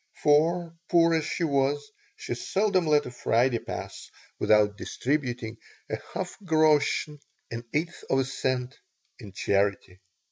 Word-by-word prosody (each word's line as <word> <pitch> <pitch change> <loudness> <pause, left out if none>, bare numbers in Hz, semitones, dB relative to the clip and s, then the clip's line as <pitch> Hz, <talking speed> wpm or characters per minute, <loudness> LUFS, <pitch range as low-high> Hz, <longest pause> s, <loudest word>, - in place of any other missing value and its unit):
For, 165 +3 +3
poor 170 -1 +5
as 160 -2 +1
she 170 - -2
was, 145 -1 0 0.2
she - - -5
seldom 190 - +1
let 150 -1 +4
a 125 - -6
Friday 120 0 +1
pass - - -7 0.3
without 105 -1 +4
distributing 125 -2 -2 0.3
a - - -1
few - - -17
half - - -4
groschen 155 -3 +2 0.3
(an 115 +1 -5
eighth 170 +3 -2
of 135 - +3
a 135 - +2
cent) 130 -1 -2 0.4
in 100 - -10
charity. 100 -1 0
145 Hz, 140 wpm, -27 LUFS, 120-155 Hz, 0.4 s, poor